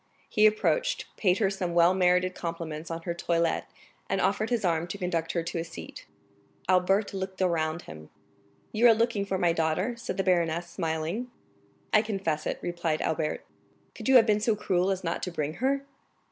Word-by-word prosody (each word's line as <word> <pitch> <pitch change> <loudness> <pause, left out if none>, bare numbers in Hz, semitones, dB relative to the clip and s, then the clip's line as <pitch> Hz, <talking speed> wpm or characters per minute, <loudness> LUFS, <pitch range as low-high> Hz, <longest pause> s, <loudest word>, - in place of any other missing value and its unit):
He 215 0 +5
approached, - - +1
paid 185 -3 +2
her 200 -4 +2
some 180 -3 -3
well 170 +1 +6
merited 180 0 +3
compliments 165 -2 -5
on 165 0 -5
her 170 - -2
toilet, 170 -1 0 0.4
and - - 0
offered 210 +2 +1
his 235 -5 0
arm 170 -1 +1
to 190 - -5
conduct 170 -4 -2
her 170 - 0
to 165 0 -3
a - - -1
seat. 170 - -10 0.6
Albert 190 +3 +2
looked 190 -1 -5
around 170 -2 0
him. 80 -1 -11 0.6
"You 230 +3 +5
are 225 - +7
looking 230 -3 +1
for 195 - 0
my 175 -2 +2
daughter?" 165 +8 0
said 235 -2 -5
the 195 - +1
baroness, 170 -2 +1
smiling. 165 +7 -2 0.6
"I 215 - +7
confess 195 -8 -2
it," - - -2
replied 170 -3 -1
Albert. 155 -1 -2 0.5
"Could - - -5
you 265 - +6
have 235 -3 +8
been 210 -2 +3
so 215 +1 +1
cruel 185 -2 +1
as 190 -1 -1
not 165 -1 -2
to - - -2
bring 155 -2 -2
her?" 275 +1 +1
180 Hz, 190 wpm, -28 LUFS, 165-210 Hz, 0.6 s, have